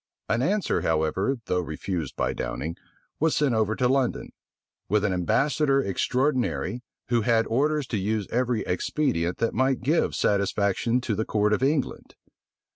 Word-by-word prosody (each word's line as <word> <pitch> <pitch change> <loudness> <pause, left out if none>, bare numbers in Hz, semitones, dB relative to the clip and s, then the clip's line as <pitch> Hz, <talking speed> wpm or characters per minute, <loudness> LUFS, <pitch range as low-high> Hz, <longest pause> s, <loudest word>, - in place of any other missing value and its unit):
An 115 +2 +1
answer, 200 +8 +1
however, 80 - 0
though 90 - 0
refused 80 -1 -4
by - - 0
Downing, 75 +7 -4 0.4
was 160 +1 +2
sent 145 -4 +2
over 110 -1 +1
to 125 - +2
London; 130 -1 0 0.6
with 105 +1 +2
an 100 - +1
ambassador 135 - +2
extraordinary, 125 +2 0 0.3
who 120 -1 +2
had 115 0 +2
orders 145 +6 +1
to 110 - -1
use 105 +1 -1
every 120 -2 +1
expedient 90 - -1
that 115 - 0
might 130 +1 +1
give 150 +7 +1
satisfaction 100 +4 +1
to 120 - -2
the 110 +2 0
court 105 -1 +1
of 105 - 0
England. 140 +1 -1
115 Hz, 150 wpm, -26 LUFS, 100-135 Hz, 0.6 s, was